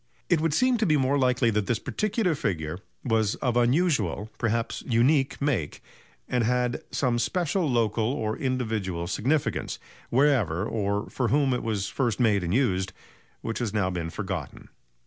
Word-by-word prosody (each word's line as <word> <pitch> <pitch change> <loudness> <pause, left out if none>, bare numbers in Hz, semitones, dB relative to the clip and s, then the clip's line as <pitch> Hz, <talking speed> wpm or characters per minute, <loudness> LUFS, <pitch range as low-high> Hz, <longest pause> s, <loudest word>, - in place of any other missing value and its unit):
It 165 -3 +3
would 160 -2 +1
seem 255 -2 +3
to 220 - +2
be 155 -2 +4
more 135 +1 +2
likely 125 -2 +3
that 105 -1 0
this 120 - +1
particular 215 - 0
figure 85 - -2 0.2
was 110 -3 +1
of 125 -3 -1
unusual, 120 - +1
perhaps 115 0 -1
unique, 135 +3 +2
make, 120 - -1 0.4
and 125 -1 +1
had 125 +1 0
some 120 -3 0
special 175 +3 0
local 115 -1 +1
or 110 -5 -2
individual 110 -10 -2
significance, 130 - -1 0.3
wherever 120 - +2
or 100 -2 -1
for 125 - 0
whom 140 0 +2
it 125 - -1
was 105 -4 -2
first 120 -6 -1
made 105 -6 +3
and 85 - -2
used, 95 -5 +1 0.5
which 115 - -3
has 110 -3 -2
now 95 -3 +1
been 85 -2 -3
forgotten. 95 -6 -5
120 Hz, 160 wpm, -26 LUFS, 100-135 Hz, 0.5 s, be